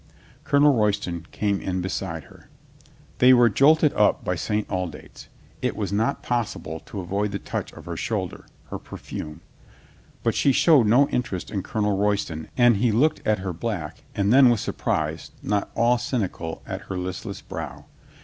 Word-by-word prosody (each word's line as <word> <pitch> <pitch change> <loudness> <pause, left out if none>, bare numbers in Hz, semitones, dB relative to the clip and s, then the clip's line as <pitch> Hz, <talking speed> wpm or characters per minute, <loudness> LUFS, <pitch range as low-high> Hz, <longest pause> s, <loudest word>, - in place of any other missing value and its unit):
Colonel 145 0 +4
Roy 105 -4 +3
ston 90 -4 -4
came 100 -2 -1
in 95 -1 -2
beside 90 -3 -3
her. - - -18 0.7
They 130 +1 +7
were 120 -1 +6
jolted 150 +6 +5
up 105 0 +2
St. 105 +5 -2
Aldate's. 90 -3 -6 0.3
It - - -1
was 100 -3 -3
not 115 +7 0
possible 105 -9 -2
to 100 - -6
avoid 100 +3 -2
the 100 - -2
touch - - -5
of - - -12
her - - -5
shoulder, - - -3 0.2
her - - -4
perfume. 75 +2 -8 0.8
But - - +2
she 140 - +3
showed 140 -6 +5
no 130 +6 +5
interest 120 -7 -3
in 100 - -2
Colonel 105 +1 -1
Royston 100 -6 -1
and 120 -3 +5
he 115 +2 +2
looked 145 +8 +2
at 105 0 +3
her 90 - -2
black 90 -5 -4
and 100 +2 +2
then 130 -1 +8
with 120 -3 +2
surprise - - -2
not 100 0 0
all 120 +1 +3
cynical 100 -9 -3
at - - -5
her 95 - -3
listless 90 0 -5
brow. - - -7
105 Hz, 170 wpm, -24 LUFS, 95-120 Hz, 0.8 s, then